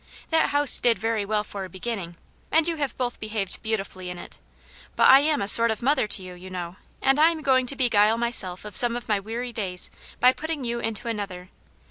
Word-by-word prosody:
That 320 Hz, 0 st, +2 dB
house 290 Hz, -1 st, +4 dB
did 235 Hz, -3 st, +2 dB
very 220 Hz, +1 st, -2 dB
well 210 Hz, 0 st, -1 dB
for 200 Hz, -2 st, -7 dB
a 190 Hz, -, -8 dB
beginning, 185 Hz, -2 st, -6 dB, 0.4 s
and 320 Hz, 0 st, +3 dB
you 335 Hz, -1 st, -2 dB
have 285 Hz, -4 st, -3 dB
both 245 Hz, -2 st, -3 dB
behaved 215 Hz, -3 st, -3 dB
beautifully 195 Hz, -4 st, -4 dB
in 180 Hz, -, -7 dB
it. -, -, -11 dB, 0.6 s
But -, -, +4 dB
I 265 Hz, -, +8 dB
am 295 Hz, -4 st, 0 dB
a -, -, -4 dB
sort 230 Hz, +2 st, +6 dB
of 220 Hz, 0 st, -3 dB
mother 265 Hz, -4 st, +2 dB
to 195 Hz, -, +2 dB
you, 180 Hz, -1 st, -9 dB
you 180 Hz, +1 st, -12 dB
know, 180 Hz, 0 st, -7 dB, 0.3 s
and 270 Hz, +2 st, +3 dB
I 315 Hz, +2 st, +6 dB
am 320 Hz, -2 st, -5 dB
going 260 Hz, -2 st, +2 dB
to 275 Hz, -, +1 dB
beguile 225 Hz, -4 st, +2 dB
myself 215 Hz, -6 st, -1 dB
of 210 Hz, -2 st, -9 dB
some 240 Hz, -1 st, +5 dB
of 240 Hz, -, -7 dB
my 210 Hz, -2 st, +1 dB
weary 235 Hz, +4 st, -6 dB
days 185 Hz, -5 st, -1 dB, 0.3 s
by 250 Hz, +1 st, +5 dB
putting 315 Hz, -3 st, -5 dB
you 235 Hz, 0 st, -2 dB
into 225 Hz, +1 st, -4 dB
another. 195 Hz, -5 st, -5 dB
225 Hz, 225 wpm, -24 LUFS, 195-255 Hz, 0.6 s, I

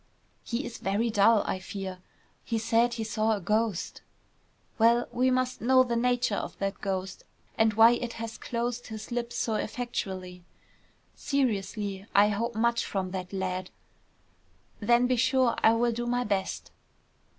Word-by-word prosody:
"He 240 Hz, +4 st, -3 dB
is 240 Hz, -, -7 dB
very 210 Hz, +4 st, 0 dB
dull, 215 Hz, +1 st, +4 dB
I 185 Hz, -, -2 dB
fear. 190 Hz, -1 st, -6 dB, 0.4 s
He 230 Hz, -, -2 dB
said 230 Hz, +1 st, +2 dB
he 225 Hz, -, -3 dB
saw 220 Hz, 0 st, 0 dB
a -, -, -4 dB
ghost." 210 Hz, 0 st, -1 dB, 0.8 s
"Well, 235 Hz, +2 st, +4 dB
we 255 Hz, +1 st, +2 dB
must 255 Hz, 0 st, 0 dB
know 255 Hz, +2 st, +5 dB
the 240 Hz, -2 st, -2 dB
nature 245 Hz, -1 st, +1 dB
of -, -, -4 dB
that 195 Hz, -1 st, -3 dB
ghost, 190 Hz, -1 st, -3 dB, 0.3 s
and 220 Hz, -1 st, +2 dB
why 225 Hz, +1 st, +8 dB
it 240 Hz, -1 st, -2 dB
has 225 Hz, -1 st, -6 dB
closed 240 Hz, 0 st, -3 dB
his 220 Hz, 0 st, -8 dB
lips 240 Hz, 0 st, -3 dB
so 225 Hz, -, 0 dB
effectually. 190 Hz, -6 st, -4 dB, 0.7 s
Seriously 205 Hz, -7 st, -2 dB
I 205 Hz, +1 st, +6 dB
hope 230 Hz, +3 st, -2 dB
much 235 Hz, +1 st, +1 dB
from 190 Hz, -2 st, -3 dB
that 185 Hz, -1 st, -5 dB
lad." 185 Hz, -1 st, -3 dB, 1.1 s
"Then 240 Hz, +3 st, +3 dB
be 250 Hz, 0 st, +1 dB
sure 260 Hz, -1 st, +3 dB
I 220 Hz, -, +6 dB
will 235 Hz, +1 st, +2 dB
do 240 Hz, +1 st, -3 dB
my 245 Hz, +1 st, +1 dB
best." 200 Hz, -4 st, -2 dB
225 Hz, 155 wpm, -28 LUFS, 200-240 Hz, 1.1 s, why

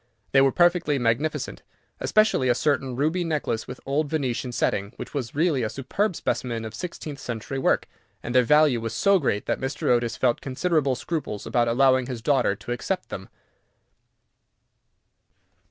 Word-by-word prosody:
They 135 Hz, -, +5 dB
were 135 Hz, 0 st, +4 dB
perfectly 175 Hz, -3 st, +3 dB
magnificent, 125 Hz, +6 st, -1 dB, 0.4 s
especially 215 Hz, -12 st, +3 dB
a 120 Hz, -, +4 dB
certain 135 Hz, -2 st, 0 dB
ruby 160 Hz, +7 st, 0 dB
necklace 150 Hz, -8 st, -2 dB
with 125 Hz, -, -8 dB
old 145 Hz, +2 st, 0 dB
Venetian 130 Hz, -4 st, -2 dB
setting, 100 Hz, -3 st, -1 dB
which -, -, -8 dB
was 130 Hz, -5 st, -4 dB
really 155 Hz, -3 st, +2 dB
a 110 Hz, -, -1 dB
superb 185 Hz, -, -1 dB
specimen 115 Hz, -6 st, -2 dB
of 110 Hz, -, -7 dB
sixteenth 150 Hz, 0 st, -6 dB
century 120 Hz, +3 st, -5 dB
work, -, -, +1 dB, 0.4 s
and 120 Hz, -, -4 dB
their 130 Hz, -, +6 dB
value 150 Hz, -1 st, +4 dB
was 115 Hz, 0 st, -4 dB
so 200 Hz, -, +4 dB
great 105 Hz, -9 st, -1 dB
that -, -, -1 dB
Mr. 130 Hz, +1 st, -2 dB
Otis 120 Hz, -1 st, +2 dB
felt 120 Hz, -2 st, +1 dB
considerable 140 Hz, 0 st, 0 dB
scruples 135 Hz, -8 st, -4 dB
about 120 Hz, -1 st, +1 dB
allowing 130 Hz, +1 st, +3 dB
his 120 Hz, -4 st, -6 dB
daughter 130 Hz, -6 st, +2 dB
to 120 Hz, -, -8 dB
accept 185 Hz, +10 st, -3 dB
them. 95 Hz, -, -7 dB
135 Hz, 160 wpm, -25 LUFS, 120-155 Hz, 0.4 s, their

